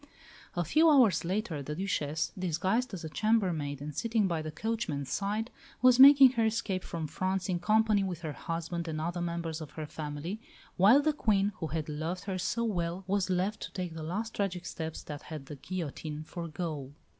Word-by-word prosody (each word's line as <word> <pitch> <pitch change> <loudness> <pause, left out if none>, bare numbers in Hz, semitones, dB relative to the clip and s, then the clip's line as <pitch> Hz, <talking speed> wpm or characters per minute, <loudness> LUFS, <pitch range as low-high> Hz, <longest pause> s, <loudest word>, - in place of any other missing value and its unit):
A 175 - +1
few 315 - +5
hours 250 - +5
later 180 -4 -2
the 150 +2 -5
Duchesse, 160 -5 -1
disguised 185 +7 0
as 190 -5 -6
a 160 - -5
chambermaid 170 -9 0
and 150 0 -5
sitting 225 -3 +1
by 165 -3 -1
the 155 - -5
coachman's 155 - -3
side, 210 +4 -1 0.3
was 255 0 +6
making 275 -1 +10
her 230 -3 +1
escape 205 -4 -1
from 165 -2 -4
France 185 +4 -2
in 175 -2 0
company 215 +2 +3
with 180 -3 -4
her 155 -3 -4
husband 165 +4 -4
and 155 -1 -3
other 170 +2 -2
members 170 -2 -3
of 150 -2 -8
her 155 - -5
family, 150 +7 -5 0.3
while 220 +10 +6
the 310 0 +2
Queen 205 -7 +2
who 160 - -3
had 160 -1 -3
loved 160 +4 -3
her 190 -2 -3
so 235 +6 -1
well 180 -4 -2
was 195 0 0
left 185 +4 0
to - - -6
take 180 -3 -4
the 160 - -6
last 205 +8 -3
tragic 180 -3 -2
steps 160 -2 -5
that 145 -1 -7
had 155 -4 -8
the 145 - -8
guillotine 155 -2 -5
for 170 +2 -6
goal. 150 -4 -5
180 Hz, 195 wpm, -30 LUFS, 160-210 Hz, 0.3 s, making